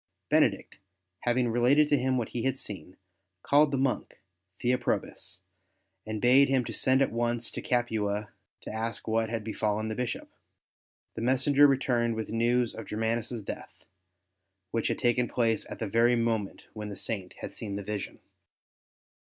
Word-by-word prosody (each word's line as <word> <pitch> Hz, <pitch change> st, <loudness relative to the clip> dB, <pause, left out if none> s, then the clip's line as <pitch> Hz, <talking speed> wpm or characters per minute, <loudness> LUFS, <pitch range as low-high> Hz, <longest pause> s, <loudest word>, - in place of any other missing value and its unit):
Benedict, -, -, +2 dB, 0.5 s
having 120 Hz, 0 st, +2 dB
related 125 Hz, +6 st, +4 dB
to 145 Hz, -, +5 dB
him 130 Hz, -1 st, +1 dB
what 115 Hz, -3 st, -2 dB
he 120 Hz, -, -3 dB
had 135 Hz, +2 st, 0 dB
seen, 95 Hz, -6 st, -7 dB, 0.5 s
called 145 Hz, +1 st, +5 dB
the 135 Hz, -, -1 dB
monk 130 Hz, -1 st, -1 dB, 0.4 s
Theoprobus 120 Hz, -6 st, -1 dB, 0.7 s
and 110 Hz, -1 st, -3 dB
bade 130 Hz, +5 st, +5 dB
him 130 Hz, -2 st, +2 dB
send 130 Hz, +3 st, +2 dB
at -, -, -1 dB
once 120 Hz, 0 st, 0 dB
to -, -, -5 dB
Capua 105 Hz, -4 st, -1 dB, 0.3 s
to -, -, -7 dB
ask 115 Hz, +1 st, -3 dB
what 110 Hz, 0 st, +1 dB
had 115 Hz, -1 st, -3 dB
befallen 110 Hz, 0 st, -1 dB
the 110 Hz, -, -3 dB
Bishop. 125 Hz, 0 st, -4 dB, 0.8 s
The -, -, -6 dB
messenger 135 Hz, +4 st, +5 dB
returned 120 Hz, -4 st, +1 dB
with 110 Hz, -1 st, -4 dB
the -, -, -5 dB
news 120 Hz, +1 st, +2 dB
of 115 Hz, -, -8 dB
Germanus' 115 Hz, +1 st, -2 dB
death, -, -, -8 dB, 0.9 s
which 115 Hz, -1 st, 0 dB
had -, -, 0 dB
taken 120 Hz, 0 st, +2 dB
place 115 Hz, -2 st, 0 dB
at -, -, -6 dB
the 110 Hz, -, -3 dB
very 115 Hz, +4 st, +4 dB
moment 115 Hz, -4 st, -1 dB
when 105 Hz, -1 st, -6 dB
the 100 Hz, -, -6 dB
Saint 95 Hz, -5 st, -5 dB
had -, -, -6 dB
seen 100 Hz, -3 st, -5 dB
the 100 Hz, -, -4 dB
vision. 105 Hz, 0 st, -5 dB
115 Hz, 160 wpm, -29 LUFS, 110-125 Hz, 0.9 s, to